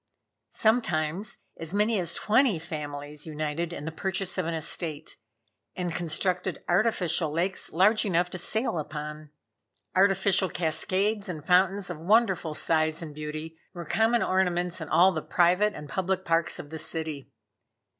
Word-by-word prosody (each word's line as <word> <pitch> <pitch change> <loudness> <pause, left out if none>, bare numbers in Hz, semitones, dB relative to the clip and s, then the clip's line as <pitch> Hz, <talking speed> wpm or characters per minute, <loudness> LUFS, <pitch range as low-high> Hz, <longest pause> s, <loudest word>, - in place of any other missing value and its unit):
Sometimes 205 -3 +1 0.2
as 165 +3 -5
many 210 +1 +2
as 170 -2 -2
twenty 225 -2 +3
families 150 -1 -6
united 155 +2 -3
in 160 -4 -6
the 160 - -3
purchase 190 +2 -1
of 180 - -1
an 170 - -1
estate, 155 -1 -3 0.6
and 175 -2 -3
constructed 180 +2 -1
artificial 180 -4 +1
lakes 175 +5 -1
large 205 +6 +4
enough 180 -3 +1
to 185 - -3
sail 220 -1 0
upon. 150 0 -6 0.7
Artificial 195 0 +3
cascades 190 +6 0
and 155 -4 -6
fountains 185 +2 +3
of 165 - -7
wonderful 190 -4 +2
size 155 +1 +1
and 155 -2 -8
beauty 155 +2 -6 0.2
were 170 -1 -6
common 225 +7 +2
ornaments 180 -1 0
in 160 - -6
all 185 +2 +6
the 160 -4 -3
private 180 +7 +2
and 150 - -8
public 190 +4 -1
parks 165 0 +1
of 145 - -9
the 160 - -5
city. 155 -3 -4
175 Hz, 145 wpm, -27 LUFS, 155-190 Hz, 0.7 s, all